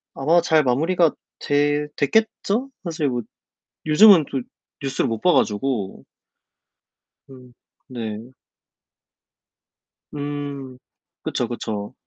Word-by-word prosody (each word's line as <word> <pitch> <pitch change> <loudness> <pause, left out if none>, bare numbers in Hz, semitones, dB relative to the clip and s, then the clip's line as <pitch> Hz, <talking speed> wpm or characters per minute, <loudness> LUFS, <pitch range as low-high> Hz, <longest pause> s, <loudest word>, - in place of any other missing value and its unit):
아마 165 +5 +3
잘 160 -3 +3
마무리가 160 +6 +2 0.3
돼 145 +1 +1
됐겠죠? 220 - 0
사실 160 -4 -2
뭐 120 -1 -2 0.7
요즘은 180 0 +7
또 135 - -1 0.4
뉴스를 135 0 -1
못 115 -1 -3
봐 180 - +4
가지고. 105 -2 -1 1.3
음 125 -2 -15 0.3
네. 115 -2 -6 1.9
음. 145 -3 -5 0.5
그쵸, 120 - -2
그쵸. 105 -4 -5
145 Hz, 165 characters per minute, -22 LUFS, 125-160 Hz, 1.9 s, 요즘은